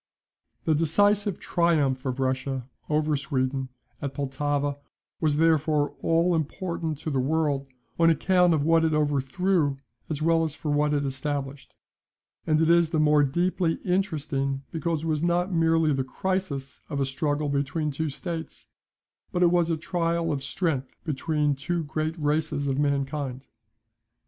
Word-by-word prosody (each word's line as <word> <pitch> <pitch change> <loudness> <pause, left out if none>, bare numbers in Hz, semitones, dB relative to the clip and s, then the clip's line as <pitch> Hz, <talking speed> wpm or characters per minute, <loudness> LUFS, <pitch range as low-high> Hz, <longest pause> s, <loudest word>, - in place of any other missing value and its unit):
The 160 - +3
decisive 200 +5 +2
triumph 145 -6 +1
of 130 0 -2
Russia 130 -1 -1 0.2
over 155 0 +1
Sweden 135 -2 -1 0.3
at 140 -2 -4
Pultowa 145 +1 -1 0.4
was 150 -2 +1
therefore 155 -2 +2
all 165 +2 +2
important 160 0 -2
to 155 - -3
the 135 - +1
world, 145 0 0 0.3
on 165 0 +6
account 175 +2 +3
of 145 - 0
what 165 +1 +4
it 160 -1 +2
overthrew 145 +2 +1 0.3
as 150 -3 -2
well 165 +1 +3
as 155 -2 -3
for 150 - -3
what 150 0 +2
it 145 -1 0
established; 135 0 -4 0.7
and 155 0 +3
it 160 - +3
is 170 -1 +4
the 160 - 0
more 150 -1 +5
deeply 170 +4 +1
interesting 150 -7 -1
because 165 -1 -2
it - - -2
was 155 -2 0
not 175 +2 +1
merely 165 -2 +3
the 135 -1 0
crisis 140 -3 -3
of 145 -3 -3
a 135 - +2
struggle 145 +2 -1
between 140 +2 -1
two 155 +3 -2
states, 165 +3 -6 0.7
but 180 - +1
it 170 - +5
was 175 -1 +2
a 165 - +1
trial 170 0 -1
of 140 -2 -2
strength 140 -4 -2
between 150 -1 0
two 170 +5 -2
great 155 +2 -3
races 150 -1 0
of 135 0 0
mankind. 140 -2 -1
150 Hz, 155 wpm, -26 LUFS, 140-165 Hz, 0.7 s, on